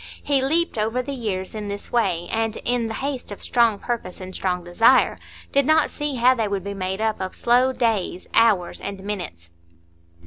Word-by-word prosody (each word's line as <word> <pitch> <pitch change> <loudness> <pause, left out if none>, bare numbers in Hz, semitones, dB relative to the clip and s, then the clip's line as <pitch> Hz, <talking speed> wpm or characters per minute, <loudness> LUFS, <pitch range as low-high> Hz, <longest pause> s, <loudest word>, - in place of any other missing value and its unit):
He 280 -2 +2
leaped 315 -2 +1
over 225 +4 0
the 280 +2 -5
years 200 -7 -3
in 210 -1 -5
this 200 0 -6
way, 185 -8 +1
and, 225 0 0
in 245 -2 +1
the 220 - -4
haste 270 -5 -4
of 205 - -8
strong 235 -4 +3
purpose 225 -6 -4
and 185 0 -8
strong 180 -2 -2
desire, 225 +9 +4 0.3
did 280 - +4
not 315 0 +4
see 295 -2 -3
how 250 +1 +5
they 225 -4 -1
would 200 -2 -2
be 200 0 -4
made 190 0 -3
up 220 -3 0
of 185 0 -4
slow 250 +2 +3
days, 220 -7 -1
hours, 205 -7 +3
and 195 -1 -6
minutes. 175 - -6
220 Hz, 195 wpm, -23 LUFS, 190-250 Hz, 0.3 s, how